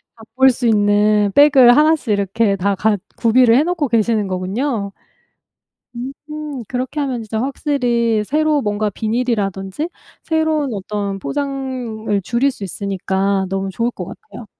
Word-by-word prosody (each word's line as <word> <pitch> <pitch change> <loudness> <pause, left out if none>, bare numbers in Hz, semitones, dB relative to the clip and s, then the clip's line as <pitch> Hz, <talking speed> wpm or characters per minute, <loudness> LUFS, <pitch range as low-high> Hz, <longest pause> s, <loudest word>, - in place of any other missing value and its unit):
바꿀 235 +4 +2
수 245 0 -2
있는 210 -1 +3
백을 270 -4 +7
하나씩 305 -4 +3
이렇게 200 0 +1
다 200 +2 0
갖 210 0 0 0.2
구비를 235 0 +4
해 285 - +5
놓고 335 -4 -1
계시는 225 -2 +1
거군요? 200 +3 -2 1.0
음. 250 +3 -5 0.6
그렇게 260 +4 -3
하면 260 -5 -2
진짜 220 0 -3
확실히 245 -5 0
새로 305 +2 +1
뭔가 210 0 -1
비닐이라든지 215 - -2 0.3
새로운 315 -4 0
어떤 200 0 -4
포장을 255 -6 -3
줄일 240 +7 +1
수 215 -7 -8
있으니까 195 0 -1
너무 195 +1 -2
좋을 230 +5 -1
것 185 - -7
같아요. 220 +2 -11
230 Hz, 290 characters per minute, -18 LUFS, 200-265 Hz, 1.0 s, 백을